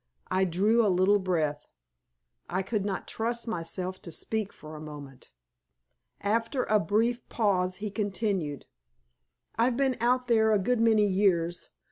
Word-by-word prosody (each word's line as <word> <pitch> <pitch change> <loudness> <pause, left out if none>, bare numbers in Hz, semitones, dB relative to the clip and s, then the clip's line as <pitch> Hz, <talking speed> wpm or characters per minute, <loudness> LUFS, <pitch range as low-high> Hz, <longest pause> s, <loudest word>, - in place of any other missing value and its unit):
I 190 +1 +3
drew 205 +7 +3
a 210 - +3
little 190 +3 +4
breath, 160 -6 -1 0.8
I 185 +2 -1
could 205 +1 -1
not 195 -2 -3
trust 235 +1 -2
myself 185 -1 -4
to 170 - -9
speak 215 +4 -3
for 155 0 -11
a 155 - -8
moment. 145 -4 -10 0.9
After 230 +5 0
a 215 0 +3
brief 225 +7 0
pause 185 -5 +1
he 205 +1 -5
continued 200 -7 -2 0.9
"I've 240 +1 +3
been 265 -2 +1
out 250 +1 +2
there 220 -2 +4
a - - +5
good 235 +5 +1
many 220 -2 +4
years. 185 -4 +1
200 Hz, 145 wpm, -28 LUFS, 180-225 Hz, 0.9 s, a